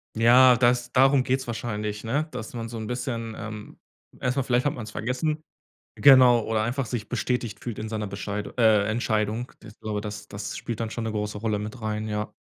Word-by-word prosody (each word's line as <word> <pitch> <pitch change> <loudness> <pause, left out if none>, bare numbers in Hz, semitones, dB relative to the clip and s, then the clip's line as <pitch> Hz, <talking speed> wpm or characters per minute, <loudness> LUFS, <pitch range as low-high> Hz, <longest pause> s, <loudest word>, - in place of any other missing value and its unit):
Ja, 125 +2 +7
das 120 0 +2
darum 135 0 +5
geht's 130 0 -1
wahrscheinlich, 105 -3 -4
ne? 140 +8 -1
Dass 125 -5 -7
man 115 -1 -5
so 115 - -6
'n 110 - -5
bisschen, 120 -1 -3
ähm 110 -1 -8 0.4
erst 125 +2 0
mal, 135 - +2
vielleicht 125 0 +1
hat - - 0
man's 110 -3 -7
vergessen, 130 +8 -2 0.5
genau, 130 -4 +7
oder 110 -1 0
einfach 125 +3 -1
sich 110 -1 -5
bestätigt 120 -3 -2
fühlt 120 -4 -6
in 110 0 -5
seiner 105 -1 -3
Bescheid 100 +1 -4
äh, 110 -3 +5
Entscheidung, 110 +1 -1
das 105 - -13
ich - - -45
glaube 110 -2 -3
das 105 0 -7
das 100 0 -6
spielt 115 -1 -5
dann 115 - -1
schon 115 +1 -4
'ne 110 - -2
große 105 0 -3
Rolle 105 0 -1
mit 110 +4 -6
rein, 110 0 -2
ja. 105 0 -3
115 Hz, 205 wpm, -25 LUFS, 105-125 Hz, 0.5 s, Ja